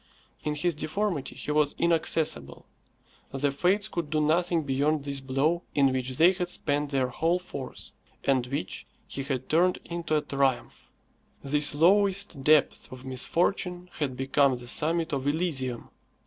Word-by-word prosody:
In 150 0 -1
his 175 +3 0
deformity 155 +1 -2
he - - -4
was 150 -1 +2
inaccessible. 160 - 0 0.6
The 140 +1 -1
Fates 185 +8 +1
could 170 -7 -4
do 155 0 0
nothing 165 +2 +2
beyond 145 +2 0
this 140 -1 -2
blow 135 +6 0
in 135 -2 +4
which 130 0 -3
they 170 +3 +6
had 180 -2 -3
spent 145 -3 0
their 135 -3 0
whole 165 +7 +1
force, 145 -7 -8 0.3
and 130 -3 +1
which 125 -8 -4 0.2
he 135 - -5
had 130 -2 -3
turned 180 +3 +3
into 170 -2 -1
a - - +1
triumph. 135 -3 -1 0.5
This 145 +1 +3
lowest 190 -1 +2
depth 150 -2 +3
of 130 0 -10
misfortune 180 +7 -1
had 135 -4 -2
become 135 0 +2
the 120 0 -11
summit 160 +5 +1
of 135 0 -2
Elysium. 145 -6 -1
150 Hz, 150 wpm, -27 LUFS, 135-170 Hz, 0.6 s, they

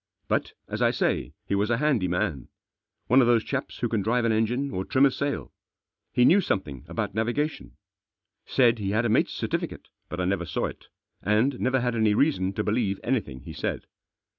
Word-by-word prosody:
But, - - 0
as - - -4
I - - +5
say, 65 +4 -1
he - - -2
was 100 +2 +1
a 120 - +2
handy 135 -9 +2
man. 90 - -1 0.6
One 130 +3 +5
of 120 - +3
those 120 -2 +4
chaps 135 -1 -4
who 120 - -1
can 110 -2 0
drive 115 +4 +1
an 115 - +3
engine 120 +6 0
or 95 - -2
trim 130 +7 +3
a 135 - +4
sail. 140 +2 -3 0.6
He 125 -1 +4
knew 195 +8 +6
some 105 - 0
thing 70 -6 -10
about - - -3
navigation. 120 +8 -2 0.7
Said 120 -3 +3
he 100 -2 -2
had 110 +4 +1
a - - +1
mate's 110 - +2
cer - - -3
tificate, - - -3 0.2
but 90 - -5
I 90 - 0
never 90 -2 -1
saw - - -1
it, - - -8 0.3
and 115 +6 +2
never 130 0 +1
had 120 -1 0
any 110 -2 +2
reason 105 -9 +2
to 105 - -1
believe 105 -2 0
anything 75 - -2
he - - -9
said. - - -3
115 Hz, 210 wpm, -26 LUFS, 100-130 Hz, 0.7 s, knew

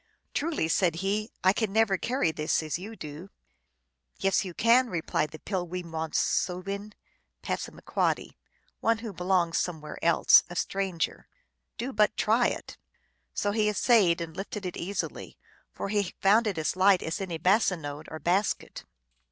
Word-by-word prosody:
" - - -47
Truly," 300 - 0
said 170 0 +2
he, 210 +3 0
" - - -47
I 185 +1 +5
can 215 -1 -1
never 220 -2 +3
carry 235 -4 0
this 155 +1 0
as 155 +2 -3
you 215 +5 -8
do! 155 +2 -8 0.3
" 60 -1 -49
" - - -43
Yes, 195 +1 +2
you 180 -3 -7
can," 240 +2 +4
replied 160 -4 -1
the 155 - -9
Pil 180 0 -3
wee 180 +1 -4
mon 160 -1 -4
soo 180 0 0
in 200 +2 -5 0.5
(P., - - -2 0.5
one 230 0 +2
who 225 -2 -7
belongs 180 -2 +1
somewhere 155 -4 -4
else, 170 0 +6
a 175 - -8
stranger). 190 -2 -2 0.2
" - - -53
Do 255 +3 -4
but 210 0 +2
try 230 +3 +3
it! - - -5 0.3
" - - -46
So 205 - 0
he 210 0 +2
essayed 205 -5 +3
and 160 -1 -6
lifted 200 0 -5
it 180 - -4
easily, 195 +4 -4 0.3
for - - -5
he 200 -3 -1
found 215 +4 +4
it 195 -5 -2
as 160 +2 -1
light 190 0 +4
as 160 +4 -3
any 175 -4 -3
bassinode 160 -5 +1
or 160 - -6
basket. 180 +7 -1
185 Hz, 175 wpm, -28 LUFS, 165-210 Hz, 0.5 s, else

